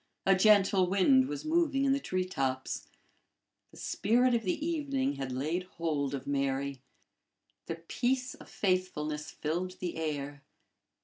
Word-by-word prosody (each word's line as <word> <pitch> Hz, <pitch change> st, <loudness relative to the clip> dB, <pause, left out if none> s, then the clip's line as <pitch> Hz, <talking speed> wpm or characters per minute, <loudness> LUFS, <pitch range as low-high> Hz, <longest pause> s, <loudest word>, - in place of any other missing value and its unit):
A 195 Hz, -, +6 dB
gentle 195 Hz, -2 st, +5 dB
wind 260 Hz, +8 st, +4 dB
was 305 Hz, -, -5 dB
moving 310 Hz, -4 st, +2 dB
in 270 Hz, -, +4 dB
the 275 Hz, -, +1 dB
tree 185 Hz, -8 st, -1 dB
tops. 135 Hz, -7 st, -2 dB, 0.8 s
The -, -, -17 dB
spirit 240 Hz, +5 st, +2 dB
of 235 Hz, -, +2 dB
the 220 Hz, -, -2 dB
evening 285 Hz, -4 st, -1 dB
had 135 Hz, -1 st, -4 dB
laid 150 Hz, +8 st, -1 dB, 0.2 s
hold 145 Hz, -4 st, -1 dB
of 135 Hz, -, -6 dB
Mary. 140 Hz, -1 st, -1 dB, 0.9 s
The 165 Hz, -, -2 dB
peace 255 Hz, +1 st, 0 dB
of -, -, -14 dB
faithfulness 160 Hz, -6 st, -1 dB
filled 175 Hz, +4 st, -3 dB
the 175 Hz, -3 st, -4 dB
air. 145 Hz, -3 st, -3 dB
185 Hz, 140 wpm, -31 LUFS, -, 0.9 s, A